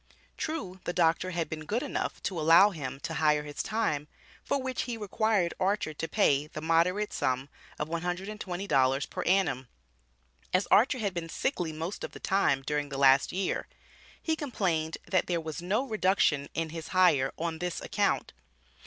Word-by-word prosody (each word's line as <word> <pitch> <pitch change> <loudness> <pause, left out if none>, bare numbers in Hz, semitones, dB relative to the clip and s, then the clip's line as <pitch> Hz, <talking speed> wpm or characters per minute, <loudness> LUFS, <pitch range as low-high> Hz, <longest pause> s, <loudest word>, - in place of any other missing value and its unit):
True, 200 - -4
the 175 - -3
doctor 170 +1 +2
had 170 -3 -2
been 155 -1 -6
good 235 +5 0
enough - - -3
to 180 -4 -2
allow 165 +6 +7
him 135 -6 -6
to 165 - -4
hire 150 -2 +2
his 145 -1 -4
time, 155 -10 -1 0.4
for 280 - 0
which 260 -1 -2
he 235 - -3
required 210 -3 +1
Archer 195 -4 0
to 165 +2 -4
pay 145 -1 +2
the 155 - -7
moderate 170 +6 +1
sum 130 +2 -1 0.3
of 150 - -2
$120 175 -5 -1
per - - -3
annum. 170 -9 +1 0.9
As 185 - +3
Archer 255 +4 +5
had 205 -5 -2
been 170 -2 -4
"sickly" 175 - -1
most 165 +5 -5
of - - -6
the - - -9
time, 150 -9 +1
during 145 +1 -2
the 135 - -5
last 135 0 +5
year, 190 +1 -2 0.5
he 320 - 0
complained 180 - -1
that 185 - +1
there 175 -2 0
was 160 -1 -5
"no 205 +10 0
reduction" 190 - +2
in 165 -1 -1
his 165 -1 -6
hire 170 -8 +4
on 165 -1 -3
this 175 0 -3
account. - - 0
170 Hz, 170 wpm, -29 LUFS, 155-195 Hz, 0.9 s, allow